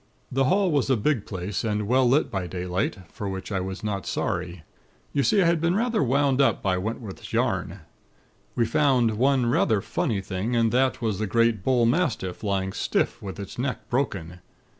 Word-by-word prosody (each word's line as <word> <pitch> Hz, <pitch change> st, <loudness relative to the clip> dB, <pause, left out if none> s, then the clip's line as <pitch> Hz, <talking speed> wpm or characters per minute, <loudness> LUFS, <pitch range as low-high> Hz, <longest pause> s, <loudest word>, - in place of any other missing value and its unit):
"The 135 Hz, +1 st, +2 dB
hall 190 Hz, +6 st, +2 dB
was 140 Hz, -3 st, +1 dB
a 130 Hz, -, +3 dB
big 120 Hz, 0 st, 0 dB
place, 95 Hz, 0 st, -3 dB
and 105 Hz, -2 st, -1 dB
well 125 Hz, +1 st, +3 dB
lit 145 Hz, +5 st, +2 dB
by 95 Hz, -2 st, -2 dB
daylight; 90 Hz, +1 st, -2 dB
for 100 Hz, -, -5 dB
which 95 Hz, +1 st, -6 dB
I 95 Hz, -, 0 dB
was 95 Hz, +3 st, -5 dB
not 100 Hz, -4 st, -3 dB
sorry. 90 Hz, -2 st, -3 dB, 0.5 s
You 140 Hz, -, +2 dB
see, 195 Hz, +7 st, +3 dB
I -, -, +2 dB
had 170 Hz, -1 st, +2 dB
been 170 Hz, +2 st, +2 dB
rather 230 Hz, +1 st, +1 dB
wound 140 Hz, +1 st, +2 dB
up 135 Hz, -, +2 dB
by 95 Hz, -2 st, +2 dB
Wentworth's 110 Hz, 0 st, -6 dB
yarn. -, -, -1 dB, 0.7 s
We 115 Hz, -, +2 dB
found 120 Hz, -4 st, +2 dB
one 135 Hz, -1 st, +3 dB
rather 115 Hz, -2 st, +2 dB
funny 115 Hz, -, -1 dB
thing, 95 Hz, +5 st, -3 dB
and 115 Hz, -1 st, +3 dB
that 130 Hz, 0 st, +1 dB
was 110 Hz, -4 st, -1 dB
the 110 Hz, -, -1 dB
great 115 Hz, -2 st, +2 dB
bullmastiff, 125 Hz, -, +1 dB
lying 95 Hz, -2 st, -1 dB
stiff -, -, -1 dB
with 95 Hz, 0 st, -7 dB
its 100 Hz, +3 st, -7 dB
neck 130 Hz, 0 st, -3 dB
broken. 95 Hz, -, -2 dB
115 Hz, 185 wpm, -25 LUFS, 95-135 Hz, 0.7 s, a